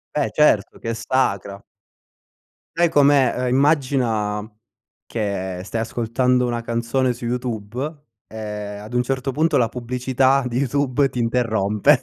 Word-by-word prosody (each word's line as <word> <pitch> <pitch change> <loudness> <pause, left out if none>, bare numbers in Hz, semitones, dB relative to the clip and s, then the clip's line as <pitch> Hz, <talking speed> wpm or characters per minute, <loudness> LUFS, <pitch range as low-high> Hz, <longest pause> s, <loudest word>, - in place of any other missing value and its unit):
Beh - - +1
certo, - - +3
che 115 - -3
è - - -2
sacra. 100 -5 -1 1.1
Sai 170 0 +3
com'è? 145 -3 +4
Ehm, 125 0 0
immagina 125 -7 +1 0.6
che 95 -4 -3
stai 115 +3 -3
ascoltando 125 +2 +1
una 120 -1 -2
canzone 120 +2 0
su 120 0 -8
YouTube 125 +5 -4 0.2
e - - -15 0.4
ad 105 +3 -10
un 125 - +3
certo 135 +1 -2
punto 155 +2 +2
la 115 -2 +2
pubblicità 125 +3 +1
di 120 0 -3
YouTube 140 +1 +1
ti 125 - -5
interrompe. 110 -4 +2
125 Hz, 135 wpm, -21 LUFS, 115-135 Hz, 1.1 s, com'è